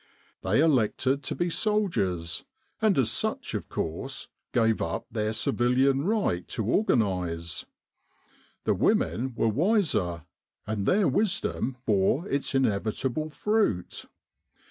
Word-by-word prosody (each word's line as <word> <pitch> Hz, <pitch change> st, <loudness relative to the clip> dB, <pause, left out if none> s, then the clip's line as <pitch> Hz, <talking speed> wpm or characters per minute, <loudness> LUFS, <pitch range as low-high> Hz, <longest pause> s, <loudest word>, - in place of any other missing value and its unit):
They 100 Hz, +9 st, +2 dB
elected 135 Hz, -2 st, +2 dB
to -, -, -2 dB
be 175 Hz, 0 st, -1 dB
soldiers, 100 Hz, -, 0 dB, 0.4 s
and 215 Hz, -3 st, +3 dB
as 130 Hz, -5 st, +3 dB
such -, -, -2 dB
of -, -, -4 dB
course, 80 Hz, 0 st, -4 dB, 0.2 s
gave 115 Hz, -2 st, +2 dB
up 85 Hz, -, -2 dB
their 110 Hz, -1 st, -1 dB
civilian 130 Hz, +5 st, +2 dB
right 200 Hz, -, 0 dB
to 110 Hz, -, -3 dB
organise. 90 Hz, -, 0 dB, 1.0 s
The -, -, +2 dB
women 125 Hz, +1 st, +1 dB
were 115 Hz, -, +1 dB
wiser, 115 Hz, -, +1 dB, 0.4 s
and 105 Hz, -2 st, -2 dB
their 200 Hz, 0 st, +4 dB
wisdom 195 Hz, -, 0 dB
bore 105 Hz, -, +2 dB
its 140 Hz, -3 st, -1 dB
inevitable 130 Hz, +5 st, 0 dB
fruit. 205 Hz, -, 0 dB
125 Hz, 115 wpm, -27 LUFS, 100-165 Hz, 1.0 s, their